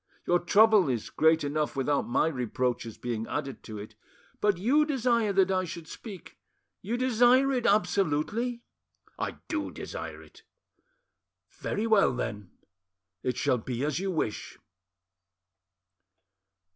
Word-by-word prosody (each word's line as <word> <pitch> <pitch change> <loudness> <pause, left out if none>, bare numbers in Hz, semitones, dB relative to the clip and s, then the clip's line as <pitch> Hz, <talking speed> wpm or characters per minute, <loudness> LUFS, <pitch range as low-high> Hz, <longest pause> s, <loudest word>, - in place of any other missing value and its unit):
Your 175 0 +3
trouble 210 -2 +5
is 120 -4 -2
great 160 0 +3
enough 150 +1 -1
without 140 +1 0
my 120 - +2
reproaches 125 -5 -2
being 115 -2 -4
added 135 - -4
to 110 -2 -7
it. 105 +1 -9 0.5
But 205 -3 +2
you 260 - +3
desire 240 -7 +1
that 190 -1 +3
I 185 -1 +1
should 170 -2 -7
speak, 200 -6 -10 0.4
you 225 +5 -2
desire 255 +2 +4
it 250 -3 0
absolutely?" 200 +5 +1 0.6
"I - - -3
do 310 -2 -2
desire - - -7
it." - - -18 1.1
"Very 210 - -3
well, 210 - +4
then; 105 -5 -4 0.7
it 125 -2 -2
shall 125 - +1
be 125 +3 -3
as 150 +1 -1
you 195 +1 -2
wish." 155 - -3
175 Hz, 130 wpm, -28 LUFS, -, 1.1 s, trouble